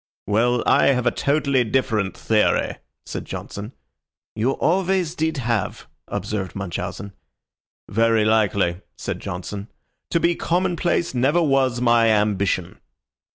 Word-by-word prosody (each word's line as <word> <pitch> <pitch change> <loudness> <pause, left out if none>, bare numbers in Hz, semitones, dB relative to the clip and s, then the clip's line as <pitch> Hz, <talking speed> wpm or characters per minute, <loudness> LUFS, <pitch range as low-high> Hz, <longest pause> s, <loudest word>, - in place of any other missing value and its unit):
"Well, 120 +4 +2
I - - +4
have 125 -3 +2
a 120 - +4
totally 140 -3 +1
different 110 -5 0
theory," 110 -1 +1 0.3
said - - -5
Johnson. 105 +3 -7 0.6
"You 120 +5 +1
always 185 0 +1
did 160 -2 -1
have," 115 -5 -2 0.2
observed 95 -5 -4
Munchausen. 100 +1 -5 0.7
"Very 115 +1 +2
likely," 100 -5 +2 0.2
said - - -4
Johnson. 100 +3 -6 0.4
"To 170 - +2
be 170 +1 +3
commonplace 175 -2 0
never 140 +7 +2
was 135 -4 +2
my 120 -1 +4
ambition." 100 -4 0
120 Hz, 115 wpm, -22 LUFS, 105-140 Hz, 0.7 s, I